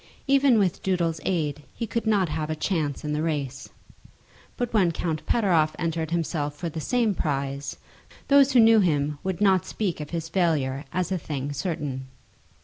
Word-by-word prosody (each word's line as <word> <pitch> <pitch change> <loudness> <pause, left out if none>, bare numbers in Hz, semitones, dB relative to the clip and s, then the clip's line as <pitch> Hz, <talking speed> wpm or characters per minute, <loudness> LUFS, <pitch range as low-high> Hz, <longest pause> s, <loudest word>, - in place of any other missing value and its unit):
Even 275 -3 +4
with 195 -5 +1
Doodle's 170 -4 0
aid 150 -5 -1
he 230 - -3
could 230 0 -3
not 200 -4 +3
have 155 0 -3
a 155 - -1
chance 155 -4 -2
in 150 - -1
the 150 - -1
race. 140 -4 -3 0.9
But 245 -2 -2
when 190 -6 +4
Count 160 -1 -3
Pateroff 170 -9 +2
entered 165 -2 -2
himself 160 -3 -2
for 170 +3 -4
the 160 0 -5
same 235 +2 +1
prize, 140 -3 -3 0.5
those 280 -1 +5
who 250 - +6
knew 225 -1 +7
him 150 -5 +1
would 190 0 -3
not 190 -3 +4
speak 195 -7 -2
of 150 -1 -6
his 165 -1 -3
failure 155 -6 0
as 185 +1 -1
a 185 - 0
thing 145 -2 -4
certain. 140 -3 -3
165 Hz, 175 wpm, -25 LUFS, 150-195 Hz, 0.9 s, knew